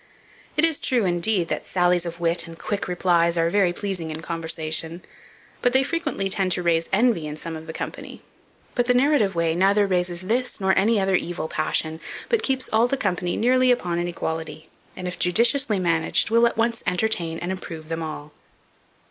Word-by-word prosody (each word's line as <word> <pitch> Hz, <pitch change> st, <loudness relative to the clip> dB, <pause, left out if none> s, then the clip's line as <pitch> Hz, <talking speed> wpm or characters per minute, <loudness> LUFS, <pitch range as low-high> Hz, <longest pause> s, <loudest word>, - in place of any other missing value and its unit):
It 305 Hz, -, +6 dB
is 325 Hz, -3 st, +1 dB
true, 245 Hz, -6 st, +1 dB
indeed, 175 Hz, +1 st, +1 dB
that -, -, -2 dB
sallies 175 Hz, -1 st, +1 dB
of 170 Hz, 0 st, -7 dB
wit 170 Hz, 0 st, 0 dB
and 165 Hz, 0 st, -10 dB
quick 205 Hz, +3 st, -3 dB
replies 175 Hz, -2 st, +2 dB
are 165 Hz, 0 st, +2 dB
very 195 Hz, -3 st, +3 dB
pleasing 180 Hz, -3 st, -4 dB
in 160 Hz, +1 st, -5 dB
conversation; 165 Hz, 0 st, -2 dB, 0.6 s
but 245 Hz, -, +2 dB
they 265 Hz, +1 st, +4 dB
frequently 295 Hz, -, -2 dB
tend 190 Hz, -1 st, 0 dB
to 180 Hz, -, -2 dB
raise 165 Hz, -1 st, +1 dB
envy 200 Hz, -6 st, +2 dB
in 150 Hz, 0 st, -6 dB
some 165 Hz, +1 st, -5 dB
of 160 Hz, 0 st, -9 dB
the -, -, -4 dB
company: -, -, -7 dB, 0.5 s
but 245 Hz, 0 st, 0 dB
the 250 Hz, -, +3 dB
narrative 250 Hz, -, +3 dB
way 165 Hz, -1 st, +1 dB
neither 195 Hz, +4 st, +3 dB
raises 180 Hz, -2 st, -1 dB
this, 240 Hz, +7 st, -1 dB
nor 190 Hz, -1 st, +2 dB
any 215 Hz, +2 st, +3 dB
other 195 Hz, 0 st, +1 dB
evil 175 Hz, -2 st, -2 dB
passion, 155 Hz, 0 st, -1 dB, 0.3 s
but 465 Hz, -, +2 dB
keeps 265 Hz, -1 st, -1 dB
all 225 Hz, +2 st, +4 dB
the 275 Hz, -, -1 dB
company 180 Hz, -5 st, -1 dB
nearly 255 Hz, +2 st, +3 dB
upon 175 Hz, -9 st, +1 dB
an 175 Hz, -, -1 dB
equality, 160 Hz, -2 st, -5 dB, 0.3 s
and, 180 Hz, -, -5 dB
if 180 Hz, -, -6 dB
judiciously 230 Hz, +4 st, +3 dB
managed, 170 Hz, +2 st, +1 dB
will 230 Hz, +1 st, +5 dB
at 235 Hz, -, -4 dB
once 230 Hz, +1 st, 0 dB
entertain 180 Hz, -3 st, 0 dB
and 175 Hz, +2 st, -4 dB
improve 165 Hz, -4 st, -7 dB
them 165 Hz, 0 st, -3 dB
all." 155 Hz, -1 st, -7 dB
180 Hz, 190 wpm, -23 LUFS, 165-220 Hz, 0.6 s, It